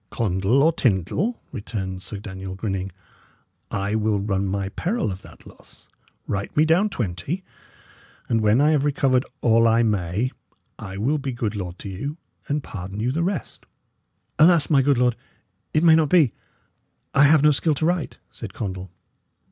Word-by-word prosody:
"Condall 105 +5 +1
or 160 - +5
Tyndal," 130 - 0
returned 95 -5 -5
Sir 100 +2 -6
Daniel, 95 -2 -7
grinning, 95 -1 -3 0.8
"I 100 +1 -2
will 110 -1 +1
run 100 -1 -1
my 95 0 -2
peril 180 - -1
of 95 +1 -7
that - - -16
loss. - - -16 0.4
Write 100 +6 -4
me 155 - +5
down 175 +7 +3
twenty, 120 - -3 0.8
and 115 -1 +1
when 110 +4 +4
I 150 +2 +4
have 150 -3 +2
recovered 135 -3 +2
all 115 0 +4
I 115 +1 +4
may, 105 +3 0 0.5
I 95 0 -7
will 140 +9 0
be 135 -1 -3
good 110 -3 -2
lord 90 -3 -5
to 100 - -7
you, 140 - -5 0.3
and 145 0 -1
pardon 95 +1 -7
you 120 +4 0
the 160 +5 -1
rest." 175 -4 -4 0.7
"Alas! 160 -1 +5
my 140 -3 +5
good 140 0 +2
lord, 125 -1 +2 0.6
it 155 - +2
may 165 -2 +7
not 160 -2 +4
be; 155 -9 +4 0.8
I 140 +1 +6
have 150 0 +5
no 150 - +6
skill 150 +2 +1
to 150 - -1
write," 175 -2 -1
said - - -8
Condall. 95 -2 -5
115 Hz, 170 wpm, -23 LUFS, 95-150 Hz, 0.8 s, may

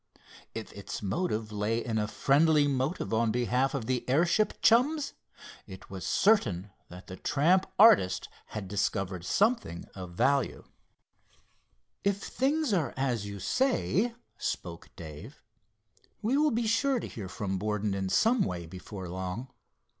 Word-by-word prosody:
If - - -6
its - - -7
motive 110 - -1
lay 105 +3 -1
in 110 -2 -1
a 105 - 0
friendly 145 +5 +3
move 135 +1 -1
on 110 0 +2
behalf 125 +4 +1
of 125 -5 -3
the 125 0 -1
airship 170 +10 +2
chums, 280 +6 +4 0.5
it - - -11
was - - -6
certain 105 - +2 0.2
that 90 +2 -11
the 95 - -9
tramp 170 - +2
artist 165 - +6 0.2
had 105 -3 -6
discovered 95 -2 -1
something 200 - +1
of 90 -2 -8
value. 135 +8 +1 1.4
"If 200 -1 +2
things 280 +4 0
are 155 -10 0
as 125 -6 -1
you 100 -1 -7
say," 240 - +1 0.2
spoke 85 -1 -4
Dave, 85 - -10 0.8
"we 235 +5 +2
will 300 +1 +4
be 235 -2 0
sure 255 +4 +2
to - - -5
hear 100 -5 -7
from 95 -1 -3
Borden 105 0 -1
in 95 -1 -2
some 225 - +3
way 90 -2 -2
before 95 +2 -8
long. 95 +8 -5
120 Hz, 140 wpm, -29 LUFS, -, 1.4 s, artist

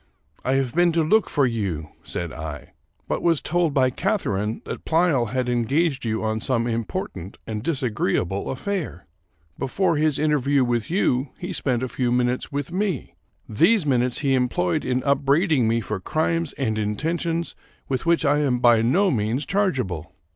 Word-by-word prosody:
" - - -43
I 130 - +1
have 135 -3 0
been 175 0 +4
to 165 -1 +2
look 215 +7 +3
for 145 -3 +2
you," 95 -11 -2
said 85 -2 -4
I, 80 -3 -7
" - - -43
but - - -1
was 165 -3 +3
told 175 -1 0
by 130 -2 +3
Catharine 115 - -1
that - - -6
Pleyel 160 -7 +2
had 130 +3 -1
engaged 130 +5 +1
you 110 0 -1
on 110 0 -1
some 120 -2 0
im 115 -1 -1
portant 95 - -6
and 110 -2 -4
disagreeable 105 - -1
aflfair. 160 - -3 0.6
Before 165 +4 +1
his 155 -2 +2
interview 145 -2 +2
with 120 -2 -1
you 135 -7 +1
he 180 +1 -5
spent 130 -6 0
a - - -1
few 125 -1 -1
minutes 125 0 0
with 145 +2 -3
me. 185 - -2 0.3
These 190 - +3
minutes 125 -2 +1
he 140 -2 +2
employed 125 -9 0
in 125 0 0
upbraiding 140 0 +2
me 115 +1 +1
for 105 -2 -4
crimes 160 - -1
and 110 -5 -1
intentions 165 +10 -2 0.3
with 135 +4 -2
which 170 -1 +3
I 145 +1 +3
am 135 -4 +1
by 120 -2 +5
no 180 - +3
means 115 +4 -1
chargeable. 125 - -1
130 Hz, 175 wpm, -23 LUFS, 115-160 Hz, 0.6 s, by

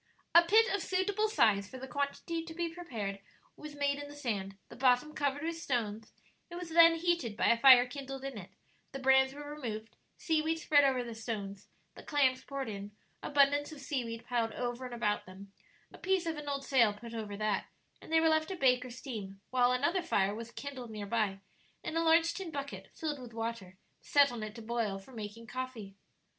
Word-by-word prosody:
A 340 - +10
pit 430 +7 +5
of 400 - 0
suitable 380 +4 0
size 210 - +3
for 260 - -8
the 265 +1 -7
quantity 285 +5 -2
to 325 -1 -9
be 340 -1 -2
prepared 225 - -5 0.4
was 300 -1 -9
made 285 0 0
in 290 - -6
the 290 - -10
sand, 200 -8 -3
the - - -11
bottom 255 +4 +3
covered 285 -1 -1
with 330 0 -3
stones; 225 -6 -2 0.4
it 345 - -8
was 355 -1 -6
then 330 0 +7
heated 330 -10 0
by - - +3
a 230 - +4
fire 255 -1 +9
kindled 270 +1 -7
in 275 -2 -5
it, 195 -3 -8 0.4
the - - -3
brands 265 0 +4
were 290 0 -8
removed, 230 -7 -6 0.2
seaweed 320 0 0
spread 295 -3 +4
over 260 -2 +2
the 235 -1 -7
stones, 210 -3 -5 0.3
the - - -12
clams 265 -4 +2
poured 275 -2 -4
in, 205 -1 -6 0.3
abundance 290 +1 +3
of 305 - -9
seaweed 240 -5 -4
piled 230 -3 -1
over 245 +1 -3
and 245 -1 -6
about 210 -4 -1
them, 195 +1 -12 0.4
a - - -12
piece 375 -1 +1
of 325 -1 -1
an 295 -1 -6
old 275 -1 -3
sail 235 -7 +4
put 230 +2 -10
over 210 -3 -5
that, 215 -2 -1 0.3
and - - -12
they 325 - +5
were 325 - +3
left 315 0 +2
to 380 - -4
bake 255 -5 +3
or 255 - -8
steam, 220 -6 -7
while 250 -1 +4
another 290 +9 +1
fire 205 - +1
was 230 +2 -7
kindled 260 -2 -7
near 210 -2 -6
by, 200 -2 -1 0.4
and - - -4
a 330 - +2
large 330 +1 +4
tin 380 -3 -5
bucket, 280 -3 -6
filled 300 -3 -3
with 245 -2 -10
water, 225 -5 -5 0.2
set 285 -2 +4
on 240 -2 -6
it 215 0 -6
to 230 - -9
boil 225 -3 -1
for 195 +7 -14
making 225 0 -7
coffee. 235 -4 -6
260 Hz, 210 wpm, -32 LUFS, 225-300 Hz, 0.4 s, A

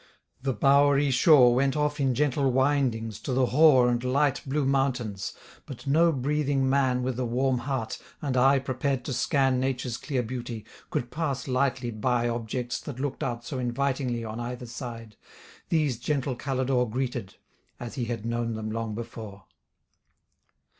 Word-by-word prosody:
The 135 0 -1
bowery 140 +3 +4
shore 125 -2 +6
Went 135 +3 +1
off 150 0 0
in 135 -3 +1
gentle 140 -1 +1
windings 125 -5 +1
to 130 - -4
the 130 0 +3
hoar 130 -1 +5
And 120 0 0
light 135 +2 +1
blue 140 +1 0
mountains: 130 -7 -1 0.3
but 135 -1 -9
no 165 +5 +4
breathing 140 -1 0
man 130 -2 +2
With 130 -1 -2
a 125 - 0
warm 125 +2 +1
heart, 130 -3 -3 0.2
and 140 -4 -2
eye 135 +2 +5
prepared 130 0 -2
to 135 - -3
scan 135 0 +2
Nature's 130 -2 -2
clear 130 -4 -2
beauty, 120 -2 -6 0.2
could 120 - -3
pass 140 -6 -2
lightly 130 -2 0
by 120 +2 0
Objects 120 +1 -3
that 135 -4 -7
look'd 140 0 -3
out 120 0 -3
so 130 -1 -4
invitingly 125 -1 -1
On 110 +1 -5
either 125 +1 -5
side. 115 -2 -8 0.5
These, 150 -8 +1
gentle 135 0 -1
Calidore 130 -2 0
Greeted, 120 -6 -3 0.4
as 120 -1 -6
he 125 - -2
had 115 -2 -4
known 115 -1 -1
them 110 0 -4
long 110 -1 -3
before. 110 -3 -8
130 Hz, 160 wpm, -27 LUFS, 120-140 Hz, 0.5 s, shore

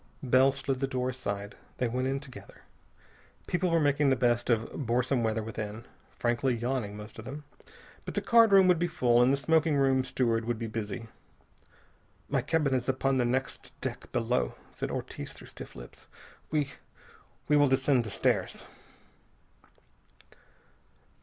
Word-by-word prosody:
Bell 130 +1 +5
slid 135 -1 -3
the 135 - 0
door 130 -1 -1
aside. 100 -5 -4 0.2
They 125 - 0
went 125 +2 -1
in 135 +1 -1
together. 125 -8 -13 0.8
People 180 0 0
were 165 0 +3
making 145 -1 +3
the 130 - +4
best 120 -1 +1
of 115 -1 +1
boresome 125 0 0
weather 110 -1 0
within, 110 0 -6 0.3
frankly 120 +2 +1
yawning, 120 -3 -2
most 105 +2 -10
of 110 - -9
them. 145 +3 -7 0.6
But - - -7
the - - +1
card 230 -2 +6
room 195 -1 +7
would 180 -3 +4
be 175 - +1
full, 120 -7 +3
and 125 +2 +5
the 140 - +2
smoking 160 +1 +2
room 135 -2 +3
steward 115 -3 0
would 120 0 -1
be 115 - -4
busy. 110 0 -4 1.2
"My 140 -2 +1
cabin 145 0 +1
is 125 0 0
upon 135 +1 +1
the 125 - +2
next 130 +2 -3
deck - - -6
below," - - 0 0.2
said - - -4
Ortiz - - -5
through - - -12
stiff - - -10
lips. - - -12 0.4
"We 150 -3 0 0.8
we 150 - +4
will 145 -1 +5
descend 130 -1 +3
the 110 - -6
stairs." - - 0
130 Hz, 160 wpm, -29 LUFS, 115-140 Hz, 1.2 s, room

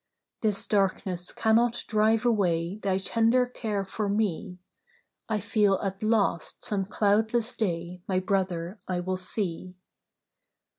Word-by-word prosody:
'This 210 -3 0
darkness 190 -3 0
cannot 235 +2 +2
drive 220 +1 +2
away 180 -5 +1
Thy 195 -2 0
tender 230 +5 +3
care 215 -5 -3
for 205 +2 -3
me. 200 -3 -1 0.7
I 215 -1 +1
feel 205 -2 +2
at 195 -1 -3
last 215 -6 0
some 195 -2 -1
cloudless 220 +4 +1
day 175 -3 -3
My 185 -1 +1
Brother 185 -1 -2
I 180 -1 -1
will 185 +1 -2
see. 185 -1 -4
200 Hz, 120 wpm, -27 LUFS, 185-220 Hz, 0.7 s, tender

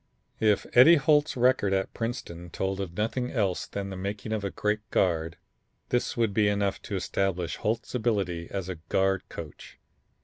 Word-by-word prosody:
If 105 -2 +3
Eddie 140 +8 +9
Holt's 150 -1 +3
record 125 -5 +3
at 95 0 -1
Princeton 90 -7 -5
told 95 +3 -2
of 90 -3 -6
nothing 125 +4 -1
else 100 -7 0
than 100 -1 -5
the - - -5
making 100 +3 -4
of 105 -2 -2
a 100 - -1
great 105 +2 -1
guard, 85 -3 +1 0.5
this 125 0 0
would 115 -4 +1
be 105 0 +3
enough 100 -1 0
to 100 - -5
establish 95 -1 -1
Holt's 115 +1 -2
ability 100 -8 -1
as 95 -2 -4
a 95 -2 -5
guard 95 -1 +1
coach. 80 -3 -9
100 Hz, 170 wpm, -27 LUFS, 95-115 Hz, 0.5 s, Eddie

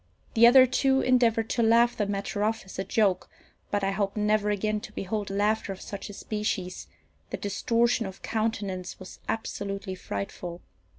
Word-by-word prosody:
The 230 +1 +7
other 260 +2 +8
two 265 +1 +2
endeavoured 230 -3 +3
to 235 - +1
laugh 235 +1 +4
the 210 - -1
matter 200 +1 -2
off 220 0 -1
as 190 - -9
a - - 0
joke, 195 -3 +1 0.4
but 205 -1 -1
I 195 - +1
hope 200 +1 -1
never 210 0 +2
again 210 +1 0
to 210 - -10
behold 205 +1 -3
laughter 205 +1 0
of 190 - -7
such 200 +1 -7
a - - -8
species: 200 -3 -3 0.4
the - - -3
distortion 230 +2 +1
of 190 - -10
countenance 205 -5 -2
was 185 - -11
absolutely 200 -3 -3
frightful. 170 - -6
210 Hz, 170 wpm, -27 LUFS, 195-225 Hz, 0.4 s, other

